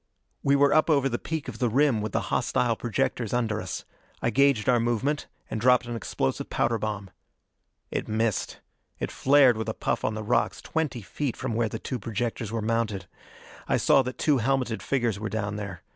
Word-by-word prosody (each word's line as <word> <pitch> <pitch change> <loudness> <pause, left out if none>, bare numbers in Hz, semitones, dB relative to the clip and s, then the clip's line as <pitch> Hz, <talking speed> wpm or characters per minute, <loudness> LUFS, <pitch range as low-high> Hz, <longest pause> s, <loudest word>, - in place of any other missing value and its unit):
We 140 0 +3
were 140 0 +4
up 155 +2 +4
over 140 -3 +4
the 120 -2 -2
peak 160 -4 -4
of 115 -3 -7
the 125 - +2
rim 130 -2 +3
with 110 0 -3
the - - -2
hostile 60 - +1
projectors - - -1
under 110 -3 0
us. 90 -3 -5 0.3
I - - 0
gauged 135 -3 +3
our 125 -2 +4
movement, 120 +6 0 0.2
and 110 - -4
dropped 125 0 +5
an 120 0 -4
explosive 65 -11 -2
powder 115 -1 +1
bomb. 105 -2 -4 0.8
It - - -2
missed. 110 -1 -1 0.4
It - - -3
flared 135 -4 +5
with 110 - -3
a - - -3
puff - - -1
on 110 - 0
the 110 - -4
rocks, 105 - +1
twenty 150 -8 -2
feet 135 +5 -3
from 130 -3 -3
where 115 0 +1
the - - -4
two 130 - -4
projectors 115 0 -3
were 115 -2 -2
mounted. 110 -3 -1 0.6
I - - +2
saw 135 - +5
that 125 0 -5
two 145 -4 +2
helmeted 125 -1 0
figures 120 -7 0
were 110 0 -3
down 105 -2 -2
there. 100 -4 -6
115 Hz, 200 wpm, -27 LUFS, 110-135 Hz, 0.8 s, dropped